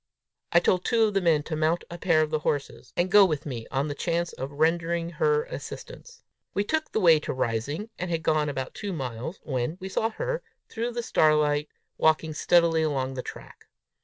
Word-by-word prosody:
I 170 - +6
told 180 +1 +2
two 230 +1 +3
of 215 -1 +2
the 195 - +2
men 160 -4 +3
to 155 - -4
mount 160 +2 +1
a 170 - -7
pair 160 -4 +3
of 155 - -4
the 155 - +1
horses, 145 -2 -3
and 175 +1 +1
go 205 0 +8
with 155 -7 0
me 120 -6 -5
on 135 +2 -1
the 145 - -3
chance 170 +3 -1
of 135 +2 -5
rendering 165 +2 +1
her 450 - +2
assistance. - - -9 0.3
We 200 - +2
took 315 +8 -1
the - - 0
way 165 -5 +6
to - - -4
Rising, 130 - -2
and 180 - -3
had 165 -1 -1
gone 155 -2 +2
about 130 -2 -4
two 205 -2 -5
miles, 130 - -5
when 130 +4 -2
we 190 0 -6
saw 220 +3 0
her, - - -3 0.3
through 235 +1 -3
the 240 0 -3
starlight, 150 -4 +2 0.3
walking 160 0 +2
steadily 165 +1 +3
along 135 -4 -1
the 130 - -4
track. - - -11
165 Hz, 205 wpm, -26 LUFS, 150-190 Hz, 0.3 s, go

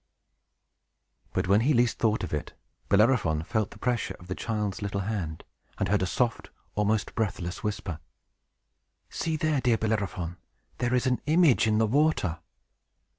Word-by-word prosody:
But, - - -1
when 100 +3 +5
he 140 +4 +3
least 120 0 +2
thought 110 -1 +1
of - - -4
it, 75 - -3 0.4
Bellerophon 100 -7 +3
felt 110 +4 -1
the - - -13
pressure 115 -7 -1
of 90 - -13
the 90 - -3
child's 105 -1 -3
little 100 -1 -2
hand, 95 -6 -3 0.3
and - - -1
heard 105 -1 +2
a 95 - +1
soft, 120 +4 -1 0.2
almost 105 0 0
breathless, 95 -6 -2
whisper. 100 -6 -3 1.1
"See 160 -1 -1
there, 155 -3 +1
dear 120 -3 +3
Bellerophon! 100 -6 -2 0.4
There 125 +1 +1
is 125 - +1
an 125 -1 +1
image 155 -7 +5
in 110 -1 +3
the 110 - +4
water!" 120 - +1
110 Hz, 155 wpm, -28 LUFS, 95-120 Hz, 1.1 s, when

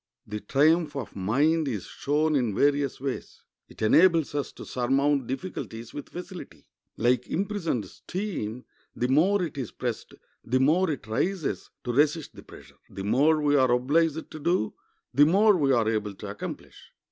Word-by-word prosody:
The 105 +1 -5
triumph 150 +5 +2
of 135 -6 -6
mind 145 - +1
is 110 -8 -3
shown 150 +2 0
in 120 -7 0
various 140 0 +1
ways. 135 0 -5 0.2
It - - -9
enables 165 +7 +4
us 145 -1 -2
to - - -10
surmount 135 +1 +1
difficulties 125 -6 -6
with 145 - -7
facility. 180 +1 -9 0.3
Like 125 +2 +2
imprisoned 180 - -2
steam, 125 - -5 0.3
the 125 - 0
more 180 +9 +3
it 155 -4 -5
is 125 - -3
pressed, - - -5 0.3
the 130 +2 +1
more 165 +7 +3
it 145 -7 -4
rises 155 - -2
to 120 - -2
resist 150 +3 +1
the - - -10
pressure. - - -15
The 95 - -7
more 150 +9 +3
we 145 0 +3
are 130 -2 +4
obliged 150 +6 +1
to 155 - -8
do, 155 - 0 0.4
the 145 +3 +6
more 205 +5 +5
we 145 -6 +2
are 115 -4 +3
able 105 -2 -1
to - - -7
accomplish. - - -9
145 Hz, 165 wpm, -27 LUFS, 125-165 Hz, 0.4 s, the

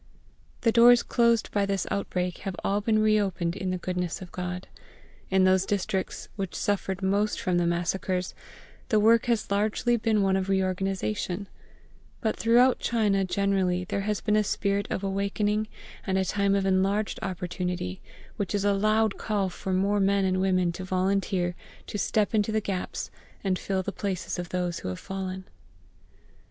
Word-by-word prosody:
The 230 - +3
doors 240 +1 +7
closed 235 -2 +2
by 200 -1 +1
this 195 -2 -1
outbreak 180 -3 -2
have 195 -2 -4
all 200 +1 +1
been 215 +1 +2
reopened 195 -5 +1
in 185 - -3
the 185 - -1
goodness 180 -1 -3
of 185 -2 -10
GOD. 180 0 -5 0.6
In 190 0 +3
those 185 0 +4
districts 195 -1 -2
which 195 -3 -4
suffered 195 -2 -1
most 200 +2 +1
from 180 -5 +1
the 170 - +1
massacres 180 +1 -1 0.6
the 215 - +4
work 230 +3 +4
has 230 -4 0
largely 215 +4 +1
been 215 -2 +2
one 190 -1 +2
of 190 0 -1
reorganisation; 190 - -1 0.7
but 220 - 0
throughout 240 +3 +4
China 210 -4 +1
generally 185 -1 +1
there 195 +2 -2
has 210 +1 -1
been 210 0 +1
a 215 - +4
spirit 200 -1 0
of 190 - -3
awakening 205 +2 0 0.4
and 190 -1 0
a 190 - +1
time 200 +1 +1
of 195 -1 +1
enlarged 195 +2 +1
opportunity; 180 - -3 0.4
which 200 -2 -2
is 200 0 0
a 205 - +4
loud 215 +1 +2
call 200 -3 0
for 190 +1 -5
more 200 +2 +2
men 195 0 +2
and 185 0 +1
women 185 -2 +2
to 180 +2 -7
volunteer 185 -1 0 0.3
to 205 - -5
step 210 0 +1
into 215 0 +2
the 220 - +2
gaps 195 -3 -4 0.3
and 190 -2 0
fill 190 -1 -1
the - - -3
places 180 -3 -3
of 175 - -5
those 180 -2 -2
who - - -6
have 90 -1 -3
fallen. 190 -1 -5
195 Hz, 170 wpm, -27 LUFS, 185-205 Hz, 0.7 s, doors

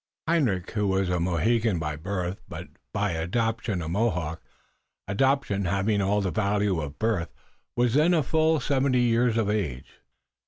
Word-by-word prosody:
Hendrik, 125 - +1
who 105 -2 0
was 95 -1 +1
a 90 -1 0
Mohegan 95 +5 +1
by 75 -2 -3
birth 90 +3 -4
but - - -8 0.2
by 105 -1 0
adoption 105 +3 -1
a - - -5
Mohawk, 90 -4 -1 0.7
adoption 105 -2 +1
having 100 +3 +1
all 100 +2 +1
the 95 -2 -1
value 100 -4 +1
of 75 -1 -6
birth, 110 -6 0 0.5
was 120 -1 +2
then 155 +5 +4
a 155 - +2
full 160 +3 +2
seventy 130 -1 +1
years 120 -1 +2
of 110 -3 +1
age. 85 -12 -3
105 Hz, 155 wpm, -26 LUFS, 90-120 Hz, 0.7 s, then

